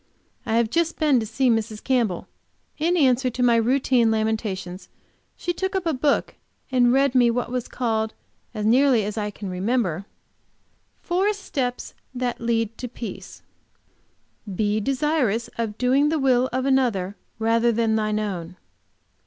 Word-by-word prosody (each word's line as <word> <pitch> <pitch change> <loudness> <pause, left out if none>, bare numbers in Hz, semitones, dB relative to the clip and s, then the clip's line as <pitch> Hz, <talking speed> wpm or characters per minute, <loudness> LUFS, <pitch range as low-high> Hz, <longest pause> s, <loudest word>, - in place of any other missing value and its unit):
I 220 - +1
have 230 -1 +2
just 335 0 0
been 295 -5 +3
to 220 - -3
see 255 +4 0
Mrs. 225 -2 0
Campbell. 235 -9 0 0.5
In 340 +4 +2
answer 260 -3 +3
to 250 +1 -2
my 240 -1 +5
routine 245 +1 +3
of 220 - +3
lamentations, 210 -4 -3 0.5
she 350 - -2
took 380 +2 -3
up 380 -2 -1
a 325 - +1
book 280 +2 +1 0.4
and 245 -2 +4
read 270 0 +3
me 245 -2 +5
what 235 0 -2
was 250 -1 -2
called, 220 -3 -2 0.4
as 210 -1 -4
nearly 250 0 +4
as 210 - -4
I 210 -2 -2
can 205 0 -8
remember, 190 -1 -1 1.0
"Four 380 +4 +1
steps 265 -11 -4 0.2
that 245 -1 -2
lead 230 -1 -1
to 250 - -4
peace." 235 -1 -8 1.1
"Be 205 +2 0
desirous 260 -2 0
of 220 -2 -2
doing 270 +4 +3
the 320 - +1
will 260 -2 +2
of 260 +1 -1
another 235 -8 +1 0.2
rather 230 +1 +2
than 225 -1 +1
thine 215 -1 0
own." 180 -5 -4
235 Hz, 155 wpm, -23 LUFS, 220-265 Hz, 1.1 s, my